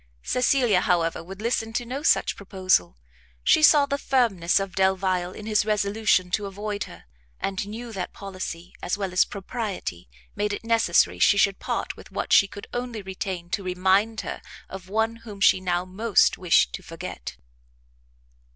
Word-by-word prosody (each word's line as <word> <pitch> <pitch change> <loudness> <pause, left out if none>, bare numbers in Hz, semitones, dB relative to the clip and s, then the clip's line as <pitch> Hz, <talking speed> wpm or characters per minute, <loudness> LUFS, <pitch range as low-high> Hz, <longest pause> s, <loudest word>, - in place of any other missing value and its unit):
Cecilia, 250 -6 +2
however, 165 -2 0
would 190 +4 -9
listen 225 -1 -1
to 240 +2 -2
no 260 +4 -4
such - - +2
proposal; 185 - 0 0.5
she - - +4
saw 300 -2 +7
the 280 0 -2
firmness 210 -12 +2
of 195 -1 -4
Delvile 190 -1 +1
in 210 - -10
his 215 -1 +2
resolution 205 -3 +1
to 205 +1 -1
avoid 205 +1 -4
her, - - -13 0.4
and 195 +1 -3
knew 230 +2 -7
that 185 -3 -4
policy, 185 -3 -7
as 180 - -2
well 195 -3 -3
as 180 - +4
propriety, 195 - -5 0.3
made 205 0 -1
it 205 - -5
necessary 175 - +2
she 200 - +5
should 200 -1 +3
part - - -3
with - - -14
what - - -2
she 195 - +7
could 200 +1 -10
only 245 -3 -4
retain 185 -2 -5
to 205 - -1
remind 190 +4 +1
her - - -6 0.3
of 190 -1 -9
one 220 +2 0
whom 215 -3 -11
she 190 - +5
now 180 -1 -1
most 205 +4 +2
wished 180 -2 +3
to - - -5
forget. 165 - -8
195 Hz, 170 wpm, -25 LUFS, 185-220 Hz, 0.5 s, saw